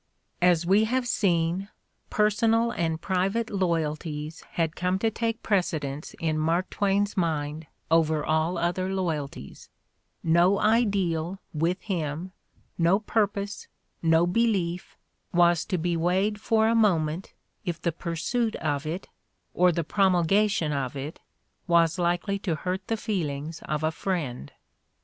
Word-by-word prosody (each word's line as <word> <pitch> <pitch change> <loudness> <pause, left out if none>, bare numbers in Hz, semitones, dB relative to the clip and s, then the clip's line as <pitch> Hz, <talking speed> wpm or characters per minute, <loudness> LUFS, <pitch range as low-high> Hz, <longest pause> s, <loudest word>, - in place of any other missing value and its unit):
As 175 -2 +4
we 200 +5 +4
have 250 +2 0
seen, 180 -2 +1 0.4
personal 225 +2 +2
and 165 -6 -1
private 195 +6 0
loyalties 160 -4 -2
had 165 -2 0
come 180 +1 0
to 225 +3 0
take 225 +1 -2
precedence 155 -8 -1
in 155 -1 0
Mark 165 +4 0
Twain's 205 0 +1
mind 155 -3 -1 0.2
over 160 -2 +3
all 160 +3 +1
other 175 +2 -1
loyalties; 155 - -4 0.5
no 170 +4 +4
ideal, 195 -6 +1 0.2
with 165 +4 0
him, 170 -2 -3 0.5
no 170 +3 +4
purpose, 205 -1 -1 0.3
no 165 0 +4
belief, 180 -3 0 0.4
was 175 -1 +4
to 185 - -1
be 175 +1 0
weighed 190 +5 +1
for 220 0 +3
a 225 - +3
moment 180 -6 +1 0.3
if 175 -4 -3
the 170 0 0
pursuit 185 +8 -2
of 145 +1 -2
it, 170 +5 -4 0.5
or 180 0 +4
the 170 0 -1
promulgation 190 0 +2
of 135 -2 -2
it, 140 +3 -6 0.5
was 170 0 +3
likely 175 +3 0
to 180 -5 -1
hurt 185 +4 -4
the 225 - 0
feel 195 -8 -1
ings 145 +3 -6
of 150 0 -1
a 155 - +2
friend. 155 - -3
175 Hz, 135 wpm, -26 LUFS, 160-200 Hz, 0.5 s, As